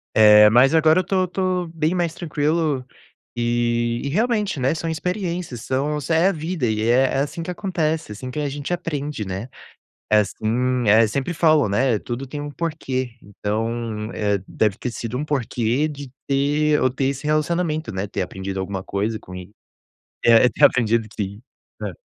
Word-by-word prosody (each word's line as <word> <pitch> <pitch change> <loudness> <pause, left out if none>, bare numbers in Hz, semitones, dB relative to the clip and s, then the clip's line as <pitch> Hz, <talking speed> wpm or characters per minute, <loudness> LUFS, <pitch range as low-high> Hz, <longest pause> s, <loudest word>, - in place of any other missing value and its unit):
Eh, 105 -1 +8
mas 125 +6 +5
agora 160 +1 +5
eu - - +1
tô 185 -1 0
tô 185 -1 -1
bem 160 0 -1
mais 175 -3 0
tranquilo, 155 -4 -1 0.5
e 120 0 0
e 140 - -2
realmente, 210 - 0
né. 130 +3 +2
São 165 0 -3
experiências, 175 - -3
são, 140 +5 -1
é 165 +2 +4
a - - +2
vida 160 -3 -3
e 110 -2 0
é 125 +2 +5
é - - 0
assim 145 +4 -3
que 180 - -4
acontece. 160 - -2
É - - -4
assim 125 +5 -7
que 150 - -4
a 145 -1 -1
gente 145 +4 -4
aprende, 150 -8 -3
né. 95 +6 -5 0.6
É 105 - +6
assim 120 +3 -1
é 110 +2 +6
sempre 135 +9 -2
falam, 155 -6 +4
né. 115 +3 +2
Tudo 125 +3 -5
tem 145 +3 -6
um 145 0 -5
porquê, 135 -6 -3
então, 110 +2 -3
eh, 105 -1 0
deve 105 -3 0
ter 125 - -3
sido 115 +1 -5
um 145 - -2
porquê 125 -1 0
de 145 -3 -8 0.2
ter 145 +2 +2
eu 130 - +2
ter 135 +2 -2
esse 140 +2 -2
relacionamento, 155 +1 0
né. 95 +1 -3
Ter 100 - -2
aprendido 95 +1 -5
alguma 95 0 -3
coisa 105 +4 -2
com 90 - -11
ele. 90 +2 -9 0.7
É 115 +1 +6
ter - - +4
aprendido 115 -2 +2
sim. 100 +1 -4 0.4
Hã. - - -4
135 Hz, 180 wpm, -22 LUFS, 110-155 Hz, 0.7 s, Eh